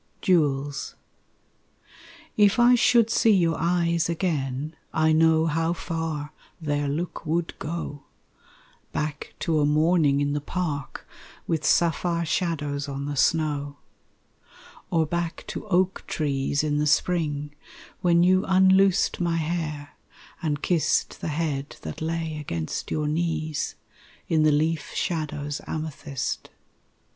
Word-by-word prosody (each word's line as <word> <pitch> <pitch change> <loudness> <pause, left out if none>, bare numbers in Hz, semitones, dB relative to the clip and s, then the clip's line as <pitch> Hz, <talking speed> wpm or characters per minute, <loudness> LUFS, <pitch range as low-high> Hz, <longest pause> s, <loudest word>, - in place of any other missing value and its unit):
Jewels 145 -5 +1 1.4
If 205 0 +4
I 240 +1 +6
should 235 -2 +4
see 225 -1 +4
your 170 -3 +2
eyes 170 0 +1
again, 155 -4 -2 0.2
I 160 0 +2
know 160 0 +4
how 165 +1 +1
far 160 -3 -4 0.3
their 145 -2 -1
look 160 +5 -3
would 165 +1 -1
go 150 -3 -5 0.9
Back 150 -1 -4
to 160 -2 +1
a 145 - +3
morning 155 -1 +3
in 145 0 0
the 145 - -1
park 145 -3 -4 0.4
With 160 -2 -1
sapphire 170 +1 +2
shadows 145 -4 -1
on 140 0 -4
the 145 0 -3
snow. 145 -1 +1 1.1
Or 165 -2 +2
back 170 +1 -3
to - - -6
oak 190 -1 +1
trees 140 -1 0
in 150 -1 0
the 150 - +1
spring 150 -2 0 0.5
When 175 -2 +4
you 185 +1 +4
unloosed 190 +2 +4
my 170 -1 +1
hair 155 -3 -3 0.5
and 150 -3 -2
kissed 170 -4 +1
The - - -3
head 150 -3 -2
that 80 - -6
lay 160 -1 -2
against 85 - -4
your 150 -1 -1
knees 155 -1 -1 0.5
In 160 -1 +2
the 155 0 +5
leaf 155 0 0
shadow's 150 -4 -2
amethyst. 150 -4 -4
160 Hz, 125 wpm, -25 LUFS, 145-170 Hz, 1.4 s, I